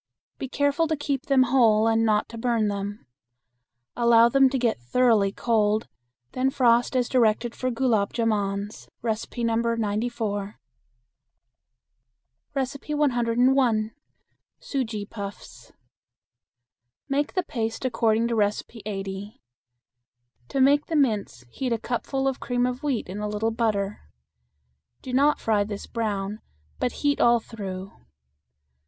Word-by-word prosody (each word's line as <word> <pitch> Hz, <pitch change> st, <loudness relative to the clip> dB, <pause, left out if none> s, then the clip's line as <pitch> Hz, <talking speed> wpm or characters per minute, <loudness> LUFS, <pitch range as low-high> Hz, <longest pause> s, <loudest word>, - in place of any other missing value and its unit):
Be 265 Hz, -, -4 dB
careful 285 Hz, +4 st, +1 dB
to 315 Hz, -, 0 dB
keep 280 Hz, -2 st, -3 dB
them 270 Hz, -2 st, +5 dB
whole 230 Hz, -4 st, +4 dB
and 225 Hz, 0 st, +3 dB
not 215 Hz, -2 st, +2 dB
to 230 Hz, -, -8 dB
burn 230 Hz, -3 st, +1 dB
them. 200 Hz, -2 st, -5 dB, 0.9 s
Allow 235 Hz, -1 st, +5 dB
them 270 Hz, +1 st, +5 dB
to 270 Hz, -, -1 dB
get 235 Hz, -, 0 dB
thoroughly 215 Hz, -, +3 dB
cold, 215 Hz, -1 st, +1 dB, 0.4 s
then 260 Hz, +1 st, +1 dB
frost 240 Hz, -1 st, +3 dB
as 250 Hz, -2 st, +2 dB
directed 235 Hz, -1 st, +2 dB
for 255 Hz, -, -2 dB
gulab 230 Hz, -5 st, +1 dB
jamans 205 Hz, -3 st, -2 dB
(No. 230 Hz, +1 st, -1 dB
94). 215 Hz, -2 st, -2 dB, 2.0 s
101. 255 Hz, -4 st, +1 dB, 0.7 s
Sujee 225 Hz, -7 st, -3 dB
Puffs. 200 Hz, -2 st, -9 dB, 1.4 s
Make 285 Hz, +1 st, -1 dB
the 370 Hz, -, 0 dB
paste 225 Hz, -4 st, -3 dB
according 230 Hz, -2 st, +2 dB
to -, -, -1 dB
No. 205 Hz, -2 st, +4 dB, 0.3 s
80. 195 Hz, 0 st, -6 dB, 1.1 s
To 270 Hz, -, -2 dB
make 285 Hz, +2 st, +4 dB
the 330 Hz, -, -2 dB
mince 220 Hz, -, 0 dB
heat 260 Hz, -2 st, -3 dB
a 230 Hz, -, +2 dB
cupful 270 Hz, +4 st, -2 dB
of 270 Hz, -1 st, -1 dB
cream 245 Hz, -1 st, 0 dB
of 250 Hz, +1 st, -3 dB
wheat 280 Hz, -7 st, -1 dB
in 190 Hz, +3 st, -6 dB
a 210 Hz, -, -2 dB
little 210 Hz, +2 st, -1 dB
butter. 210 Hz, -3 st, -1 dB, 1.0 s
Do 255 Hz, -, -6 dB
not 285 Hz, +3 st, +3 dB
fry 215 Hz, -2 st, +2 dB
this 205 Hz, -1 st, -6 dB
brown, 210 Hz, -3 st, -3 dB, 0.4 s
but 250 Hz, -, 0 dB
heat 285 Hz, 0 st, +2 dB
all 235 Hz, 0 st, +5 dB
through. 195 Hz, -4 st, -7 dB
230 Hz, 125 wpm, -25 LUFS, 210-255 Hz, 2.0 s, them